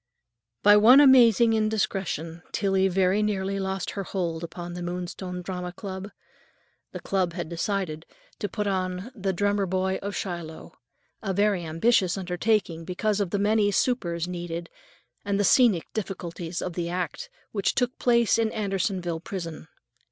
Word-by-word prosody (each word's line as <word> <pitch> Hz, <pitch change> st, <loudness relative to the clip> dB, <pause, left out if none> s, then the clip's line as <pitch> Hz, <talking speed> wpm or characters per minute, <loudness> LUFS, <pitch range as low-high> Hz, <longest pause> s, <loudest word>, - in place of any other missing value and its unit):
By 205 Hz, 0 st, +8 dB
one 235 Hz, +6 st, +8 dB
amazing 240 Hz, -5 st, +6 dB
indiscretion 195 Hz, -6 st, -1 dB
Tillie 195 Hz, -1 st, +2 dB
very 190 Hz, +2 st, +2 dB
nearly 195 Hz, -2 st, -1 dB
lost 190 Hz, -1 st, -3 dB
her 200 Hz, -, -4 dB
hold 170 Hz, -3 st, -3 dB
upon 175 Hz, +1 st, -6 dB
the 175 Hz, -, -6 dB
Moonstone 180 Hz, +1 st, -5 dB
Drama 180 Hz, -1 st, -4 dB
Club. 190 Hz, +1 st, -7 dB, 0.8 s
The -, -, -6 dB
club 185 Hz, -3 st, -1 dB
had 170 Hz, -2 st, -5 dB
decided 170 Hz, -2 st, -3 dB, 0.3 s
to 205 Hz, -, -2 dB
put 210 Hz, -2 st, -3 dB
on 185 Hz, +2 st, -2 dB
"The 195 Hz, -5 st, -2 dB
Drummer 205 Hz, +1 st, 0 dB
Boy 190 Hz, +1 st, 0 dB
of 200 Hz, +1 st, -4 dB
Shiloh," 170 Hz, -3 st, -6 dB, 0.5 s
a 195 Hz, -3 st, -2 dB
very 200 Hz, -3 st, +2 dB
ambitious 175 Hz, +3 st, +2 dB
undertaking 180 Hz, -2 st, 0 dB
because 205 Hz, +4 st, -1 dB
of 200 Hz, -3 st, 0 dB
the 200 Hz, -, -1 dB
many 205 Hz, +1 st, +3 dB
supers 175 Hz, -6 st, 0 dB
needed 175 Hz, -1 st, -5 dB, 0.5 s
and 200 Hz, 0 st, -1 dB
the -, -, +3 dB
scenic 210 Hz, -4 st, +4 dB
difficulties 175 Hz, -4 st, -4 dB
of 180 Hz, -, -4 dB
the 170 Hz, 0 st, -3 dB
act 180 Hz, -, -4 dB, 0.2 s
which 200 Hz, -2 st, 0 dB
took 250 Hz, -1 st, 0 dB
place 235 Hz, -2 st, +3 dB
in 225 Hz, -1 st, +1 dB
Andersonville 195 Hz, -5 st, -1 dB
Prison. 165 Hz, -3 st, -6 dB
190 Hz, 150 wpm, -26 LUFS, 175-205 Hz, 0.8 s, By